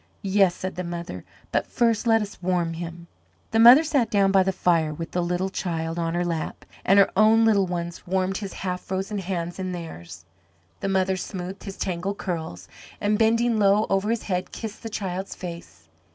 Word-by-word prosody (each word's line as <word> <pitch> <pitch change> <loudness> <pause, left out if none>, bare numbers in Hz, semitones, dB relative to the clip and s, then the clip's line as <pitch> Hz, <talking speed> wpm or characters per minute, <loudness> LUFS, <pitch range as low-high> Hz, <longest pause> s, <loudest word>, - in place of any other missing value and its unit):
"Yes," 195 -2 +3
said 185 0 -5
the 180 - -2
mother, 170 - -6 0.3
"but - - 0
first 230 -1 +1
let 225 -1 +4
us 205 -2 -10
warm 175 -2 0
him 170 0 -7 0.2
" - - -39
The 225 - +2
mother 245 +7 +9
sat 280 -7 +1
down 195 -2 +3
by 195 -1 +5
the 190 +1 +1
fire 170 -4 +1
with 165 +1 -6
the 180 - 0
little 180 +2 -1
child 165 -2 -3
on 165 0 -1
her 175 0 0
lap, 165 -2 -4 0.2
and 195 - +4
her 200 - +5
own 220 +2 +5
little 200 -4 +3
ones 175 -1 -5
warmed 190 +1 0
his 200 -3 -5
half 180 -1 -2
frozen 195 +2 -3
hands 175 -2 -4
in 185 -1 -3
theirs. 90 - -8 0.5
The 195 - -2
mother 190 0 +1
smoothed 185 +1 -6
his 195 -2 -7
tangled 190 +2 -3
curls, 160 - -5 0.3
and, 210 +1 +1
bending 230 0 +3
low 205 +1 +4
over 195 +2 +1
his 230 -1 -1
head, 180 -2 -2
kissed 220 -2 -7
the 225 - -6
child's 190 -2 -4
face. 170 -2 -9
190 Hz, 195 wpm, -25 LUFS, 175-205 Hz, 0.5 s, mother